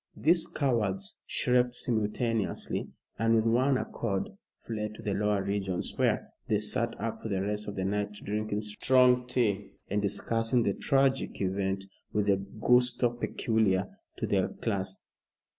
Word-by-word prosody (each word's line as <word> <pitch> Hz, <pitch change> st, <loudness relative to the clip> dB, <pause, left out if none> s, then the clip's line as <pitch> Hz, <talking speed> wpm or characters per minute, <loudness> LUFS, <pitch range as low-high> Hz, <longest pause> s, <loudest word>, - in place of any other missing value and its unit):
These 165 Hz, +2 st, +3 dB
cowards 105 Hz, -8 st, -1 dB
shrieked 125 Hz, 0 st, +2 dB
simultaneously, 115 Hz, -2 st, -1 dB, 0.3 s
and 115 Hz, +1 st, +3 dB
with 110 Hz, 0 st, +3 dB
one 130 Hz, +4 st, +3 dB
accord 100 Hz, -7 st, -2 dB, 0.3 s
fled 105 Hz, -2 st, -4 dB
to 115 Hz, -, -10 dB
the 105 Hz, -3 st, -1 dB
lower 105 Hz, 0 st, +1 dB
regions, 95 Hz, -2 st, -2 dB
where -, -, +1 dB, 0.2 s
they 105 Hz, -, +2 dB
sat 110 Hz, +3 st, -1 dB
up 115 Hz, -1 st, -3 dB
for 110 Hz, -, -5 dB
the 95 Hz, -2 st, 0 dB
rest 105 Hz, +1 st, -2 dB
of 105 Hz, -, -5 dB
the 95 Hz, -, -2 dB
night 105 Hz, +1 st, -1 dB
drinking 105 Hz, +1 st, -3 dB
strong 125 Hz, +4 st, +3 dB
tea, 105 Hz, -5 st, 0 dB, 0.2 s
and 105 Hz, +1 st, +1 dB
discussing 115 Hz, +4 st, +1 dB
the 100 Hz, -, +1 dB
tragic 135 Hz, +2 st, +1 dB
event 95 Hz, 0 st, -1 dB, 0.3 s
with 105 Hz, -1 st, +1 dB
the 100 Hz, -1 st, +3 dB
gusto 120 Hz, +5 st, +2 dB
peculiar 110 Hz, -5 st, 0 dB, 0.3 s
to -, -, -1 dB
their -, -, +2 dB
class. 95 Hz, -1 st, -2 dB
105 Hz, 145 wpm, -29 LUFS, 100-120 Hz, 0.3 s, These